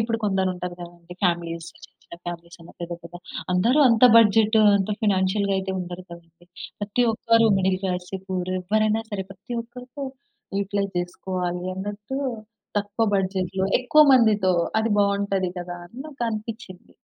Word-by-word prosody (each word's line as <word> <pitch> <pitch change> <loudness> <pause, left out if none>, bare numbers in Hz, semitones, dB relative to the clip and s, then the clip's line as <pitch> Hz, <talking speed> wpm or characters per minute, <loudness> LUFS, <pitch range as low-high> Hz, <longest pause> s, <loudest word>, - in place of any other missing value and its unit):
ఇప్పుడు 230 0 -1
కొందరుంటారు 185 -3 -1
గదండీ 175 0 -11
ఫామిలీస్ 170 -2 -1
చిన్న - - -16
చిన్న 170 - -12
ఫ్యామిలీసన్నా, 170 0 -9
పెద్ద 170 0 -5
పెద్ద 170 +1 -10 0.4
అందరూ 235 +11 +3
అంత 230 +1 +5
బడ్జెటు, 220 0 +5 0.2
అంత 195 +1 -1
ఫినాన్షియల్‌గా 200 0 +1
అయితే 190 0 -3
ఉండరు 180 0 -6
కదండీ. 170 0 -14 0.3
ప్రతి 205 +4 0
ఒక్కరు 230 +1 +3
మిడిల్ 190 0 +1
క్లాసే, 180 +1 -3
పూర్, 185 -1 -2
ఎవ్వరైనా 215 +3 +1
సరే, 195 -2 -3
ప్రతి 205 +6 -8
ఒక్కరికో 250 +3 -9 0.5
యుటిలైజ్ 200 0 -2
జేసుకోవాలి 180 0 -3
అన్నట్టు 205 +7 -5 0.6
తక్కువ 205 +2 -1
బడ్జెట్‌లో, 190 0 -1
ఎక్కువ 305 +5 +6
మందితో 215 -7 +4 0.3
అది 225 0 0
బావుంటది 200 -2 +1
కదా! 175 0 -6
అని 235 +9 -12
నాకనిపిచ్చింది. 225 - -6
195 Hz, 135 wpm, -24 LUFS, 180-220 Hz, 0.6 s, ఎక్కువ